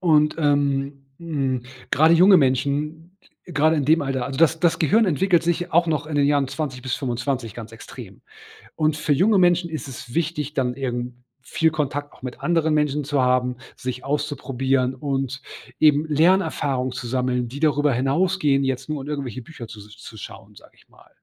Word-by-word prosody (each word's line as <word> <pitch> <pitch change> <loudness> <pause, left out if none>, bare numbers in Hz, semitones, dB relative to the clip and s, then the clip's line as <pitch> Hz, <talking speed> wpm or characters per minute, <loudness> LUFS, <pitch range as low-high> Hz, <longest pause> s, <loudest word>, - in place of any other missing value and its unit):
Und, 150 -4 +3
ähm, 140 -2 0
hm, 140 -7 -2 0.3
gerade 160 +3 +5
junge 185 +3 +7
Menschen, 150 +5 -1 0.3
gerade 155 -1 +2
in 145 - 0
dem 155 +3 +3
Alter 135 -3 -2
also 135 -1 -6
das 165 0 +3
das 170 -2 +2
Gehirn 215 +8 +3
entwickelt 175 +1 +2
sich 175 +1 -1
auch 170 +1 +4
noch 155 -2 -1
in 155 - -5
den 145 -1 +3
Jahren 145 -1 +2
20 135 -3 -4
bis 130 -1 -2
25 125 -3 -3
ganz 115 -2 -9
extrem. 115 -3 -11 0.6
Und, 155 -1 +1
für 150 -1 +1
junge 195 +9 +3
Menschen 175 -1 +3
ist 155 -4 -5
es 130 -2 -9
wichtig, 155 -3 -2
dann 125 -3 0
eben 125 -2 -4 0.2
viel 160 +5 0
Kontakt 145 -1 -3
auch - - -20
mit 125 -1 -7
anderen 165 -2 +1
Menschen 150 -1 0
zu 140 -1 0
haben, 125 0 +1 0.2
sich 125 0 -5
auszuprobieren 135 -2 -1
und 135 0 -3 0.4
eben 150 0 +4
Lernerfahrung 155 -5 +1
zu 125 -1 -6
sammeln, 125 0 -1
die 130 +4 -8
darüber 145 -1 +2
hinausgehen, 140 +3 +1
jetzt 130 0 -2
nur 150 -2 -3
in 135 - -9
irgendwelche 135 -4 -4
Bücher 120 -3 -10
zu 110 -1 -11
s 105 +1 -13
zu 110 0 -12
schauen, 100 - -11
sage - - -17
ich - - -26
mal. - - -22
145 Hz, 185 wpm, -22 LUFS, 130-160 Hz, 0.6 s, junge